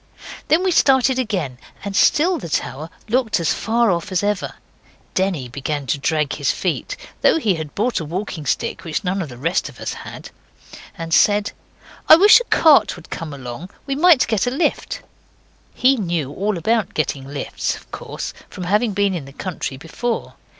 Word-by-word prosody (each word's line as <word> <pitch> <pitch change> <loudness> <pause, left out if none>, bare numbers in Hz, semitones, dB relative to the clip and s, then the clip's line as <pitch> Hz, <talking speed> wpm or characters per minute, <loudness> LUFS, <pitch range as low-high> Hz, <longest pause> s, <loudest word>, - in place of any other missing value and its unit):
Then 330 +4 +3
we 375 - +2
started 265 -4 +4
again, 180 - -2 0.3
and 200 -1 -4
still 335 - +3
the 170 - -7
tower 150 +1 -3 0.2
looked 225 -3 +1
as 165 - +1
far 230 -1 +1
off 175 +3 -2
as 185 +1 0
ever. 205 -2 -1 0.6
Denny 185 -9 0
began 140 +3 -4
to 140 - -1
drag 150 +1 0
his - - -1
feet, - - -2 0.2
though - - +4
he 220 -11 +1
had 155 -3 -6
brought 235 +4 0
a 160 - -5
walking 165 -2 -5
stick - - -1
which 165 +4 -3
none 190 +1 -1
of 160 - -5
the 120 - -10
rest 165 +8 -1
of - - -15
us - - -4
had, - - -9 0.7
and 165 -1 -4
said 205 +3 +4 0.6
'I - - +12
wish 405 +8 +8
a - - -3
cart 315 -9 +5
would 175 -2 -14
come 165 -2 -5
along. 135 +5 -8 0.2
We 275 - -2
might 310 -1 +5
get 220 0 0
a - - +3
lift.' 340 - -1 0.7
He 265 +1 +4
knew 170 - -2
all 205 +2 -1
about 220 +6 0
getting 140 -3 -2
lifts, 140 0 -3
of - - -16
course, - - -6 0.2
from 185 - -7
having 210 +4 +1
been 200 0 +1
in 165 -6 -4
the 135 - -11
country 155 -5 -5
before. 230 - -4
190 Hz, 185 wpm, -20 LUFS, 155-240 Hz, 0.7 s, I